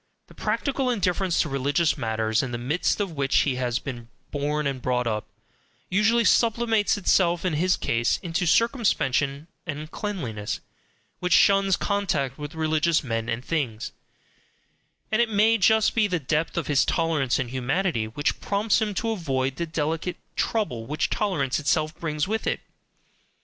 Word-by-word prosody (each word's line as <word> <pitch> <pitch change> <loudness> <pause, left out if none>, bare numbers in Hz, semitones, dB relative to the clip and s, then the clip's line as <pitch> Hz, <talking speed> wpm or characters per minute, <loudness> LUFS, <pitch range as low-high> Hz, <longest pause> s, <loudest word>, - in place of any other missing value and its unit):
The - - -14
practical 270 -2 -1
indifference 185 -5 0
to - - -1
religious 140 +4 +1
matters 110 -3 0
in 130 - -4
the 120 - -2
midst 140 - 0
of 200 -3 -1
which 140 -3 0
he 130 -3 0
has 120 -2 0
been 120 -4 -7 0.2
born 150 +1 -1
and 135 -2 -2
brought 125 0 0
up, 110 -2 -2 0.6
usually 220 +5 +3
sublimates 225 -2 +3
itself 175 -3 +2
in 180 - +1
his 180 +4 +2
case 115 0 +1
into 175 +1 -1
circumspection 155 - +1 0.2
and 155 +1 -5
cleanliness, 125 - -4 0.6
which 180 -1 0
shuns 195 -2 +5
contact 175 -11 -1
with 150 +2 -7
religious 160 0 +1
men 115 -3 -2
and 120 +2 -3
things; 125 -9 -2 1.2
and 215 +2 +3
it 235 - +2
may 220 +2 +4
be - - -15
just 220 +1 +4
the 220 -2 +3
depth 155 +3 -1
of 170 - 0
his 145 -2 +3
tolerance 160 -6 +1
and 130 -4 -3
humanity 130 - 0
which 145 +7 -2
prompts 210 +2 +1
him 210 -2 -1
to 225 +4 -1
avoid 135 -9 -1
the 170 - -2
delicate 160 +2 -2 0.2
trouble 125 - -1
which 150 +2 -1
tolerance 150 -11 0
itself 155 +1 +1
brings 150 -2 -1
with 220 +2 -2
it. - - -1
155 Hz, 160 wpm, -25 LUFS, 135-195 Hz, 1.2 s, shuns